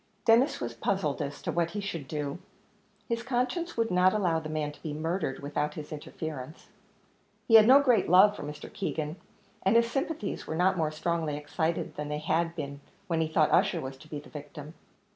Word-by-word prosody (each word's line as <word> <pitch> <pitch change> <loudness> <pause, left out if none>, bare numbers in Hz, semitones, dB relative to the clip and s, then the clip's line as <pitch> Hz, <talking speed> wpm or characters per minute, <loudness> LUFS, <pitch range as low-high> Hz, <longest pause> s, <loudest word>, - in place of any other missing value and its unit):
Denis 240 +6 +4
was 120 -1 -4
puzzled 155 +4 -1
as 145 0 -5
to - - -1
what 170 -1 +1
he 205 - -4
should 170 -8 -5
do; 145 +1 -3 0.7
his 230 0 -1
conscience 255 +7 -1
would 230 0 +1
not 180 +2 +4
allow 175 -6 +2
the 155 -1 -7
man 155 -1 -2
to 150 - -17
be 150 -2 -4
murdered 160 -2 -2
without 150 +1 -2
his 150 -1 -7
interference; 155 -1 -7 0.8
he 225 - +1
had 220 -1 +9
no 265 +3 +9
great 245 -10 +3
love 195 +4 +7
for - - -8
Mr. 150 0 -8
Keegan, 160 -4 -3 0.4
and 195 +4 +2
his 235 0 +4
sympathies 270 -5 -3
were 160 - -3
not 185 +3 +3
more 160 -3 +1
strongly 155 -1 -2
excited 160 +3 -2
than 150 0 -4
they 150 - -2
had 165 +2 0
been 140 -3 -6 0.2
when 165 -4 0
he 160 - +1
thought 155 -1 +2
Ussher - - +3
was 130 0 -6
to 155 - -15
be 150 - -5
the 145 - -10
victim. 150 +1 -9
160 Hz, 200 wpm, -29 LUFS, 150-200 Hz, 0.8 s, had